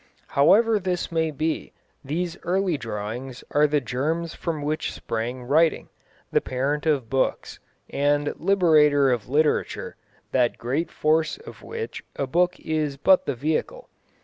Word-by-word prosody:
However 210 +10 +4
this 180 -3 -2
may 160 -1 +1
be, 155 +2 -3 0.3
these 165 +5 -2
early 185 0 0
drawings 115 +1 -5
are 150 +1 +4
the 150 0 +2
germs 155 +7 -2
from 160 -4 -4
which 155 +1 -2
sprang 120 +3 -4
writing, 155 +6 +2 0.4
the - - +3
parent 140 +4 -2
of 140 -6 +1
books, 135 +3 -1 0.3
and 145 +1 +1
liberator 155 -7 +4
of 120 -2 -2
literature, 150 +2 0 0.3
that 125 -2 +2
great 135 +8 -2
force 155 - +1
of 450 +2 -12
which 455 0 -6
a 140 - -1
book 175 +6 +1
is 155 -3 -2
but 185 +6 +4
the 140 - -1
vehicle. 160 - -2
150 Hz, 140 wpm, -24 LUFS, 135-170 Hz, 0.4 s, However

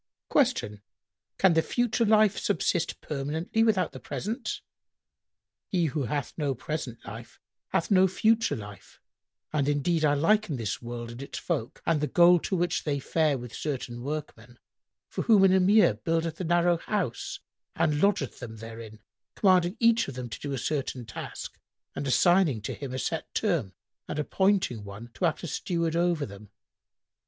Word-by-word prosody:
Q 235 - +1 0.6
"Can 190 -3 +5
the 160 - +4
future 240 +3 0
life 215 -1 +5
subsist 175 -4 0
permanently 155 +9 -1
without 195 -7 +2
the - - -9
present?"—"He 195 -4 -6
who 150 -2 -1
hath 140 +3 -3
no 145 -4 0
present 130 -2 -5
life 115 +3 -10 0.3
hath 165 - -1
no 190 -1 +6
future 220 +4 +2
life: 105 -3 -11 0.5
and 145 -2 +1
indeed 155 +3 +1
I 145 -1 +4
liken 190 +2 +2
this 115 -5 -3
world 120 -1 -6
and 120 +2 -9
its 140 - -7
folk 145 -10 -3
and 160 -3 +2
the 150 - +1
goal 175 +1 +6
to 190 - -2
which 175 0 0
they 145 -2 -1
fare 155 0 +1
with 120 -2 -9
certain 125 -5 -4
workmen, 125 -4 -6 0.5
for - - -4
whom 210 -4 +6
an 190 -1 +6
Emir 190 - +5
buildeth 165 - -2
a - - -2
narrow 175 +1 +3
house 390 - -3 0.4
and 150 -2 +1
lodgeth 200 -9 +1
them 115 -3 -8
therein, 110 -1 -10 0.3
commanding 185 -1 +3
each 230 0 +4
of 140 - -7
them 125 -1 -5
to - - -7
do 145 - -5
a 135 - -2
certain 130 -3 -2
task 110 - -7 0.4
and 140 - -3
assigning 175 - +4
to - - -3
him 140 -3 -6
a 130 - -3
set 160 +4 -3
term 160 - 0 0.3
and - - -4
appointing 185 - +1
one 100 +4 -9
to 180 - -1
act 165 0 0
as 170 - -4
steward 170 -3 -1
over 170 -3 +1
them. 100 0 -12
155 Hz, 165 wpm, -28 LUFS, 125-185 Hz, 0.6 s, no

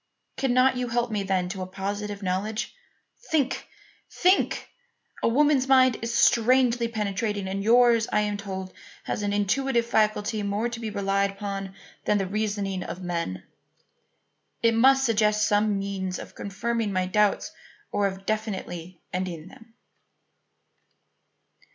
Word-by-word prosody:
Cannot 255 0 +3
you 250 0 -1
help 240 0 -1
me 210 -2 -1
then 190 -2 0
to 190 0 -5
a 185 - -4
positive 200 +2 -4
knowledge? 205 +5 -2 0.6
Think! 290 -5 0 0.4
think! 370 +2 +2 0.5
A - - +2
woman's 275 +2 +3
mind 260 -2 +5
is 230 +1 -2
strangely 240 0 +3
penetrating, 210 -2 -2
and 195 +1 -3
yours, 235 0 +5
I - - +3
am 210 0 -1
told, 190 -2 -6 0.3
has - - -3
an 205 0 -1
intuitive 235 +5 +1
faculty 215 -1 +1
more 205 +3 -1
to 235 -1 -6
be 225 -2 -4
relied 200 -1 0
upon 195 -1 -5 0.3
than 210 - +3
the 195 - 0
reasoning 200 -1 -2
of 180 +1 -6
men. 170 - -3 1.2
It 230 0 +4
must 270 +4 +5
suggest 210 -2 +2
some 205 0 +2
means 195 -2 -3
of - - -9
confirming 225 +2 -2
my 185 -1 0
doubts 205 +2 +1 0.4
or 205 -1 +2
of 190 0 -7
definitely 185 -5 -4
ending 180 -2 -4
them." 230 -3 -17
210 Hz, 140 wpm, -26 LUFS, 195-235 Hz, 1.2 s, mind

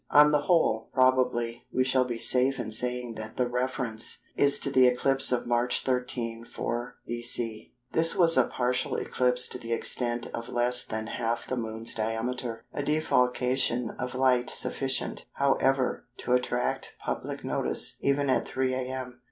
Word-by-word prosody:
On 150 0 +6
the 150 -1 +2
whole, 145 -10 +1
probably, 125 -2 +1
we 130 - +1
shall 130 0 +2
be 120 -2 -4
safe 125 +3 +3
in 110 -2 -4
saying 125 +1 -2
that 110 0 -8
the 125 - +1
reference 125 -2 -3
is 140 0 +4
to 140 - -2
the 130 -2 +5
eclipse 135 +2 +3
of 125 - 0
March 120 +1 +1
13, 125 -3 -2
4 120 +1 -5
B.C. 120 -2 -2 0.2
This 165 +1 +5
was 170 -4 +7
a - - +5
partial 125 0 -1
eclipse 125 0 +1
to 125 - -2
the 115 -1 -4
extent 120 0 -1
of 115 +1 -6
less 125 +1 +3
than 110 0 -5
half 115 +1 -3
the 130 - -3
Moon's 115 -1 -4
diameter, 115 +1 -3
a - - -3
defalcation 125 -4 +1
of 125 - -4
light 130 -1 +2
sufficient, 135 -1 -1
however, 135 -2 0
to 125 - -2
attract 125 0 -1
public - - -5
notice - - +1
even 140 +1 +1
at 130 - +1
3 130 -1 -1
a.m. 130 -1 -5
125 Hz, 160 wpm, -27 LUFS, 120-130 Hz, 0.2 s, was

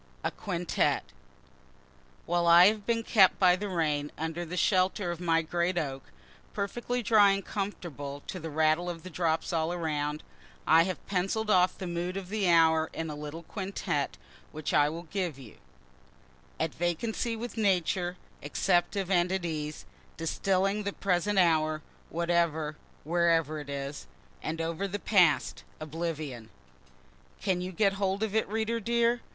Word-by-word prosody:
A - - 0
QUINTETTE 180 -4 -1 1.2
While 175 0 +1
I 170 +1 +9
have 210 -1 -5
been 230 -1 +1
kept 195 -5 +5
by 180 -2 +5
the 205 +2 -4
rain 150 -5 0
under 160 +2 -3
the 175 +2 -6
shelter 185 -1 +2
of 170 - -6
my 165 -2 +2
great 175 +2 -1
oak, 135 -5 -3 0.5
(perfectly 240 +4 -2
dry 205 -3 +6
and 195 -1 -3
comfortable, 145 -8 -5
to 185 - -5
the 165 -1 -6
rattle 155 +3 +2
of 165 -2 -6
the 185 - -9
drops 165 0 0
all 160 0 0
around,) 150 -3 -2 0.4
I 165 +1 +6
have 185 -1 -5
pencill'd 200 +3 -1
off 185 -1 +4
the 190 - -5
mood 175 +2 -3
of 190 -2 -6
the 205 -3 0
hour 160 -1 +4
in 160 -1 -4
a - - -5
little 150 +3 -7
quintette, 185 -6 -3 0.3
which 155 -1 -4
I 145 0 +4
will 165 +2 -6
give 175 -3 -3
you: 125 -6 -13 1.0
At 160 -1 -1
vacancy 215 +7 -1
with 235 +2 -6
Nature, 180 -4 +1 0.2
Acceptive 175 - 0
and 175 -1 +3
at 190 -2 -1
ease, 155 -2 -4 0.3
Distilling 195 +5 0
the 200 -1 -3
present 195 +1 0
hour, 155 -3 +3 0.3
Whatever, 170 -2 0 0.3
wherever 165 -2 +2
it 145 -1 -9
is, 140 0 -5 0.3
And 160 +1 -3
over 165 +4 -2
the 200 +1 -3
past, 180 -8 +2 0.2
oblivion. 155 -7 -5 0.9
Can 185 -3 0
you 180 +1 -4
get 195 +2 +2
hold 195 +2 0
of 215 -2 -2
it, 220 - +1
reader 225 +2 -1
dear? 235 +1 +1
175 Hz, 155 wpm, -29 LUFS, 160-195 Hz, 1.2 s, I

